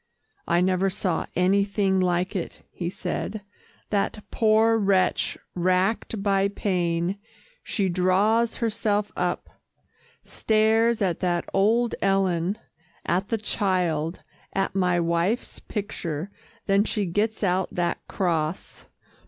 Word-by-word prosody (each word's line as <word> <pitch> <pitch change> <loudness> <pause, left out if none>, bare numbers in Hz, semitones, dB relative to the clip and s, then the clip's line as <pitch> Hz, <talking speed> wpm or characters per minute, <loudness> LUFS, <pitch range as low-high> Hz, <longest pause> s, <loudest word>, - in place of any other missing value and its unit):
"I 170 +1 +3
never 185 +1 +2
saw 185 -2 -2
anything 195 +1 +2
like 180 +2 0
it," 180 - -5
he 170 -1 -4
said, 200 +2 -4 0.5
"that 210 +1 -1
poor 220 0 +4
wretch 195 -2 +2 0.2
racked 185 +4 0
by 195 -1 +3
pain. 180 -2 -1 0.4
She 200 -4 -1
draws 195 +6 +2
herself 210 -2 0
up 180 0 -3 0.6
stares 220 +1 +2
at 180 -3 0
that 175 -2 0
old 225 +5 +3
Ellen, 195 -1 +1 0.5
at 185 +3 0
the 225 - +1
child 180 -6 -1 0.3
at 195 - 0
my 180 -2 +2
wife's 170 +7 0
picture 185 -4 -4 0.3
then 200 0 +3
she 210 -2 -1
gets 210 +5 -1
out 185 -1 +1
that 175 -1 0
cross. 165 -3 -2
195 Hz, 110 wpm, -25 LUFS, 180-210 Hz, 0.6 s, poor